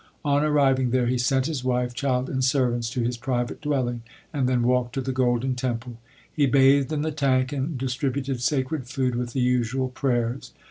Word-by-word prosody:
On 145 0 +2
arriving 135 -4 +3
there 125 0 +1
he 125 +1 0
sent 130 +2 +1
his 145 -5 -3
wife, 125 -1 0
child, 130 0 0
and 130 -1 -2
servants 125 -3 +1
to 125 0 -2
his 120 +1 -1
private 120 0 -2
dwelling, 130 -5 -1 0.3
and 135 -4 +1
then 125 -2 +1
walked 125 0 +1
to 135 - -1
the 130 +1 -3
Golden 130 0 +1
Temple. 125 -2 -4 0.4
He 145 -2 +2
bathed 135 +2 +4
in 150 -1 -1
the 160 - -1
tank 130 -3 +1
and 140 +1 -2
distributed 130 0 -2
sacred 130 0 -1
food 130 -1 -1
with 120 0 -3
the 130 - 0
usual 125 +1 +1
prayers. 125 -2 -2
130 Hz, 190 wpm, -25 LUFS, 125-135 Hz, 0.4 s, bathed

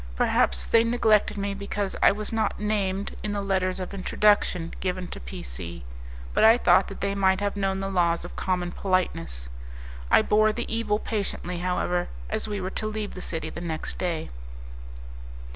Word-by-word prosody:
Perhaps 65 0 +2
they 230 0 +4
neglected 220 -3 +3
me 200 0 -2
because 200 0 -3
I - - +7
was 210 +2 -4
not 220 -1 0
named 200 -2 -1
in 210 -1 -3
the 205 - -1
letters 190 -1 0
of 185 +1 -5
introduction 190 -3 +2
given 180 -1 -2
to - - -7
P - - -8
C, 65 +6 -7 0.5
but - - +3
I 225 +2 +8
thought 185 -4 +4
that 195 - -9
they 200 0 0
might 190 -1 +3
have 205 0 -1
known 195 -1 -1
the 195 - -2
laws 170 -2 +1
of - - -9
common 180 -2 -1
politeness. 180 - -1 0.6
I - - +6
bore 215 +1 +3
the 240 - -3
evil 215 -2 +1
patiently, 195 -5 -3
however, 180 0 0 0.2
as - - -1
we 205 -1 -3
were 185 0 -3
to 215 - -2
leave 215 -1 -4
the 185 - -7
city 160 -3 -3
the 170 - -7
next 160 -2 -4
day. 170 - -2
195 Hz, 180 wpm, -26 LUFS, 180-210 Hz, 0.6 s, I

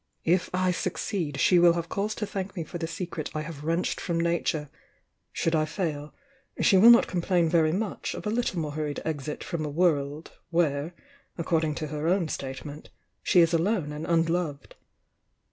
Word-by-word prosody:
If 175 +2 +2
I 185 0 +1
succeed, 170 -4 -3
she 180 +4 +5
will 170 0 +6
have 170 -1 -3
cause 205 +5 -2
to 210 - -3
thank 195 -1 -5
pie 170 - -3
for 175 - -7
the 165 - -2
secret 165 -1 -5
I 155 - -1
have 155 -2 -8
wrenched 165 +3 -1
from 170 -3 -1
Nature,— 165 -3 -1 0.6
should 165 - -1
I 155 -1 +2
fail, 155 -3 -3 0.5
she 205 - +4
will 205 +5 +8
not 240 0 +8
complain 175 -1 +1
very 160 -1 +3
much 200 +3 -3
of - - -7
a 210 - 0
little 225 -6 -1
more 150 -2 -2
hurried 150 -1 -3
exit 150 -2 -4
from 170 -3 -3
a 150 - -3
world, 150 -2 0 0.2
where, 165 -1 0 0.4
according 160 -3 0
to 155 - -4
her 150 +1 -3
own 175 -2 +2
state 135 -1 -5
ment, 150 +1 -9 0.3
she 180 - +4
is 165 0 +3
alone 170 -2 +1
and 150 +1 -6
unloved." 165 -3 0
165 Hz, 185 wpm, -27 LUFS, 155-180 Hz, 0.6 s, will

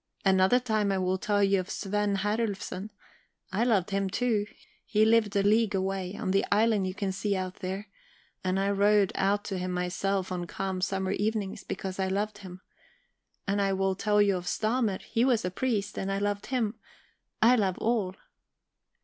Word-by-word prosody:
Another 190 +5 +5
time 215 -5 0
I 195 - +1
will 185 0 0
tell 205 0 +1
you 195 -1 +3
of 185 +2 -5
Svend 205 -1 -1
Herlufsen. 205 -2 -2 0.6
I 200 +5 +1
loved 210 -5 +2
him 195 0 0
too; 215 0 0 0.4
he 215 0 +2
lived 220 -2 +3
a 200 - +3
league 210 0 +3
away, 190 0 -2
on 200 -4 -2
the 195 +1 +3
island 210 -2 +3
you 185 - -4
can 200 -1 -2
see 195 +2 -1
out 185 -1 -4
there, 190 +2 -5 0.6
and 185 +1 0
I 200 +1 +1
rowed 200 0 +3
out 200 +1 +1
to 195 -2 -3
him 180 0 -3
myself 185 +2 -1
on 175 -1 -3
calm 190 0 -3
summer 190 0 -1
evenings, 205 -1 -2
because 190 -2 -5
I 190 - +1
loved 205 +2 -2
him. 185 -2 -10 0.9
And 200 +1 +1
I 195 -1 +1
will 195 0 +1
tell 210 +2 +1
you 200 -2 +2
of 180 0 -7
Stamer. 220 -3 0
He 230 0 0
was 245 -7 +2
a 180 - -1
priest, 205 -2 -1
and 195 0 -2
I 195 - 0
loved 205 0 -2
him. 230 -4 -1 0.6
I 235 +3 +6
love 195 -6 +1
all..." 215 -5 0
200 Hz, 185 wpm, -28 LUFS, 190-210 Hz, 0.9 s, I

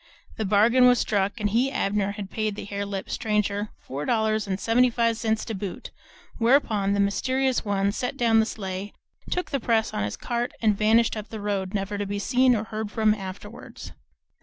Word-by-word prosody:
The 220 - -1
bargain 230 +6 +5
was 250 0 +5
struck, 205 +1 0
and 205 -1 0
he, 250 +5 +2
Abner, 200 -4 0
had 205 -2 -7
paid 215 -2 -2
the - - -6
hare 200 0 -4
lipped 195 -1 -5
stranger 210 -1 -1
four 140 +3 -6
dollars 220 0 +1
and 190 0 -2
seventy 245 +4 +3
five 230 -1 +1
cents 220 -1 -1
to 225 - -4
boot; 195 -2 -6 0.5
whereupon 225 -5 +3
the 200 - 0
mysterious 260 +6 +1
one 200 -1 0
set 250 +5 -3
down 230 -3 +4
the 220 - +2
sleigh, 195 -1 -5 0.4
took 360 - -2
the 275 - 0
press 225 -2 +1
on - - -2
his 105 - -3
cart, 240 0 -2
and 215 -2 +2
vanished 220 +3 +3
up 215 0 -6
the 220 - -6
road, 200 -1 -2
never 200 +1 -2
to 205 - -2
be 205 +1 -3
seen 250 +4 +3
or 215 - -1
heard 220 -1 -5
from 215 0 +2
afterwards. 200 +1 -9
215 Hz, 200 wpm, -25 LUFS, 200-230 Hz, 0.5 s, bargain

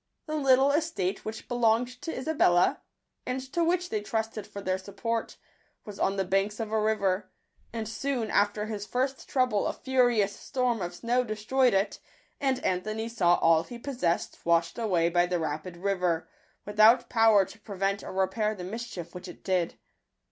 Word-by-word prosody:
The 310 - -5
little 275 -2 +4
estate 285 - -1
which 220 0 -7
belonged 245 +1 +1
to 325 - -4
Isabella, 255 - +2 0.4
and 255 +1 -2
to 340 - +2
which 355 +1 0
they 215 - -1
trusted 220 0 -3
for 200 - -8
their 185 -1 -1
support, 220 +4 -4 0.5
was 205 -2 -9
on 195 - +1
the 195 -1 0
banks 195 +3 0
of 220 -1 -3
a 220 -1 +1
river; 200 -3 0 0.4
and 225 -1 -4
soon 245 0 -2
after 205 +1 +2
his 210 -2 -5
first 265 +2 -2
trouble 255 -6 +1
a - - -1
furious 245 -6 +2
storm 250 -5 -1
of 175 0 -4
snow 245 +5 +1
destroyed 235 +2 +1
it, 195 +2 0 0.4
and 270 -2 0
Anthony 215 +5 -1
saw 175 -7 +3
all 165 -1 +4
he 240 +7 -9
possessed 240 -10 -2
washed 170 +3 +1
away 180 -7 +2
by 175 +1 +2
the 180 0 0
rapid 160 +2 -4
river, 180 -3 0 0.4
without 220 +4 +5
power 225 -4 +5
to 220 - -14
prevent 200 -1 -2
or - - -7
repair 190 +3 0
the 180 - -7
mischief 190 -4 -6
which 180 +1 -8
it 175 - -11
did. 185 -3 0
215 Hz, 170 wpm, -28 LUFS, 185-245 Hz, 0.5 s, without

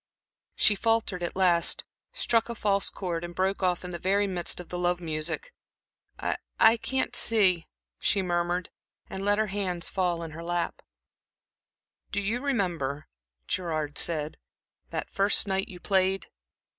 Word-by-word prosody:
She 210 - +4
faltered 225 -3 0
at 175 - -3
last, 175 -3 +4 0.3
struck 230 0 +1
a 235 - -3
false 200 -2 +1
chord, 175 -3 -3
and 175 0 -6
broke 190 +1 0
off 180 -1 +1
in 180 - -5
the 170 - -5
very 200 +3 +2
midst 180 -3 0
of 180 - -8
the 175 - -4
love 175 0 +1
music. 170 - -3 0.6
"I - - -1 0.2
I 225 +1 +7
can't 265 +3 -1
see," 190 -7 +4 0.3
she 200 -2 +1
murmured, 175 0 -1 0.4
and 190 - -4
let 205 +1 +3
her 215 - +2
hands 180 -4 -1
fall 175 -3 0
in 165 - -6
her 165 +2 -8
lap. 175 0 -2 1.3
"Do - - 0
you 215 +5 -1
remember," 175 - -1 0.4
Gerard 155 -5 -1
said, 155 -3 0 0.5
"that - - -4
first 200 +2 +3
night 195 0 0
you 180 - -10
played? 190 0 +1
185 Hz, 155 wpm, -28 LUFS, 170-200 Hz, 1.3 s, I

